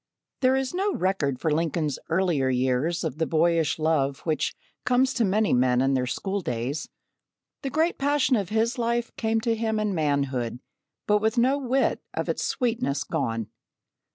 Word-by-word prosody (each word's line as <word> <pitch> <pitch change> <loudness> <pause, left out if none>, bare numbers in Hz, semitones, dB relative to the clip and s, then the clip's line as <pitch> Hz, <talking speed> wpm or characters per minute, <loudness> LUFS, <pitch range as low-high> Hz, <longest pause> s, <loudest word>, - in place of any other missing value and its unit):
There 260 0 +3
is 265 +1 -1
no 390 +2 0
record 155 -9 0
for 160 - 0
Lincoln's 155 -2 -1
earlier 165 -6 +1
years 130 +6 0
of 145 - -4
the 160 - +1
boyish 165 0 +2
love 150 -4 +1
which 155 -2 -1 0.3
comes 255 +1 +2
to 240 - +1
many 210 +1 +2
men 125 0 +3
in 135 +1 +2
their 125 -1 0
school 195 +9 -2
days. 125 +2 -3 0.7
The 275 - -3
great 320 +5 0
passion 280 -2 +2
of 200 -5 -1
his 225 +3 0
life 235 0 -1
came 225 0 0
to 230 0 +1
him 220 -1 -1
in 210 -2 0
manhood 140 -7 0 0.5
but 210 0 +3
with 220 +2 0
no 260 +4 +3
whit 265 0 +1
of - - -2
its - - -1
sweetness 235 - -1
gone. 115 -8 -2
180 Hz, 170 wpm, -26 LUFS, 140-235 Hz, 0.7 s, There